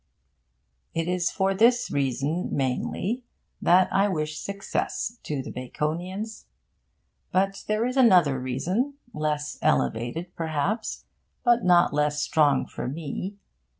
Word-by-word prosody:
It 165 0 0
is 180 -1 +1
for 195 -1 +1
this 240 +5 +3
reason, 140 +5 -1
mainly, 145 - -1 0.4
that 180 +1 +5
I 195 +1 +4
wish 155 -5 -2
success 200 +3 -3
to 145 -3 -3
the - - -7
Baconians. 175 - -4 0.9
But 195 +1 +1
there 215 +2 +1
is 250 +2 -2
another 180 - +5
reason, 180 - -1 0.2
less 150 -1 -2
elevated 120 - 0
perhaps, 165 +7 -2 0.4
but 240 -1 +4
not 175 -1 +5
less 150 0 +1
strong 145 -3 +3
for - - -6
me. 165 +7 -4
175 Hz, 115 wpm, -26 LUFS, 150-200 Hz, 0.9 s, that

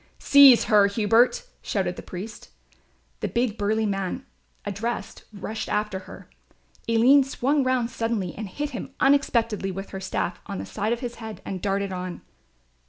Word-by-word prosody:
"Seize 280 -4 +7
her, 210 -3 +5
Hubert," 225 - +3 0.2
shouted 185 -3 -2
the - - -8
priest. 195 +5 -8 0.7
The - - -2
big 235 -3 0
burly 220 +1 0
man, 195 +5 -3 0.4
addressed, 210 +4 -4
rushed 215 +1 -5
after 210 -2 -1
her. - - -11 0.6
Aline 250 +5 +6
swung 270 +2 0
round 255 -2 0
suddenly 225 -6 -2
and 215 -2 -6
hit 290 +8 -4
him 250 - -7
unexpectedly 235 -7 +2
with 195 +1 -6
her 190 - -5
staff 180 -1 -3
on 200 -2 -5
the - - -5
side 215 +2 -2
of 235 +1 -1
his 240 -2 -5
head 220 -1 -7
and 185 -2 -5
darted 200 -1 -1
on. 180 -1 -5
220 Hz, 160 wpm, -25 LUFS, 195-245 Hz, 0.7 s, Seize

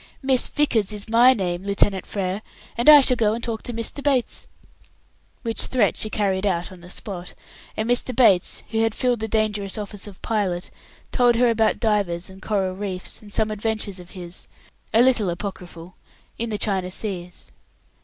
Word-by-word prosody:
"Miss 265 -2 +3
Vickers 225 -9 +1
is 210 0 -3
my 235 +3 +6
name, 185 -6 -1
Lieutenant 200 -1 +1
Frere, 195 0 -2 0.3
and 235 +5 +4
I 295 -1 +11
shall 255 -1 +3
go 220 -2 +2
and 230 - -7
talk 225 -2 -3
to - - -5
Mr. 230 +4 -4
Bates." 270 -4 0 1.0
Which 230 -2 +3
threat 235 -6 +2
she 215 - -1
carried 195 -3 0
out 180 -3 0
on 185 -2 -13
the 175 - -13
spot; 180 -2 -6 0.4
and 220 - -1
Mr. 245 +1 0
Bates, 200 -8 +3
who 225 - 0
had 225 -1 +1
filled 245 -2 +1
the 220 - -3
dangerous 210 -2 -1
office 205 -1 -6
of 195 -2 -12
pilot, 195 -6 -1 0.4
told 245 -2 +4
her 240 0 +4
about 220 -1 +2
divers 195 -5 0
and 190 +1 -14
coral 190 -3 -1
reefs, 190 -2 -5
and 210 -1 -14
some 215 +1 0
adventures 215 -2 -3
of 175 0 -12
his 175 -1 -8 0.4
a 230 +2 +5
little 245 -7 +3
apocryphal 175 -1 -7 0.4
in 230 0 -2
the 210 - -2
China 190 -4 -1
Seas. 180 -3 -6
210 Hz, 180 wpm, -23 LUFS, 190-230 Hz, 1.0 s, I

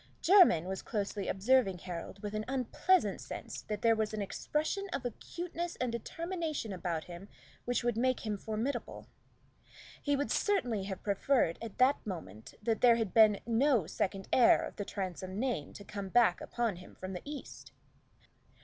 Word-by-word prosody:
Jermyn 350 - +6
was 190 +1 -4
closely 205 -2 -3
observing 200 -1 +3
Harold 180 +3 -7
with 205 0 -4
an 215 0 -2
unpleasant 270 +8 +1
sense - - -7
that 210 -1 -5
there 230 -1 +5
was 220 0 -1
an 210 - -3
expression 310 - -2
of 250 - -3
acuteness 340 +8 -5
and 250 -2 -1
determination 320 - -3
about 175 -3 -3
him 180 +3 -10 0.4
which 245 0 0
would 240 -1 +1
make 255 +1 +1
him 215 -2 -2
formidable. 220 +7 -4 1.0
He 285 -1 +1
would 285 +1 -1
certainly 245 - +1
have 190 -2 -6
preferred 200 -3 +1
at 230 -3 -7
that 260 +3 +4
moment 135 - -7
that 225 0 0
there 240 -2 +7
had 225 -5 -2
been 215 -3 +6
no 235 - +3
second 195 +4 -2
heir 245 - +6
of - - -7
the 205 - -3
Transome 185 -1 -5
name 235 - -1
to 205 - -10
come 200 -1 -6
back 225 -5 +4
upon 230 -6 -2
him 180 - -13
from 185 +1 -6
the 180 - -5
East. 290 -1 -8
220 Hz, 165 wpm, -32 LUFS, 190-260 Hz, 1.0 s, there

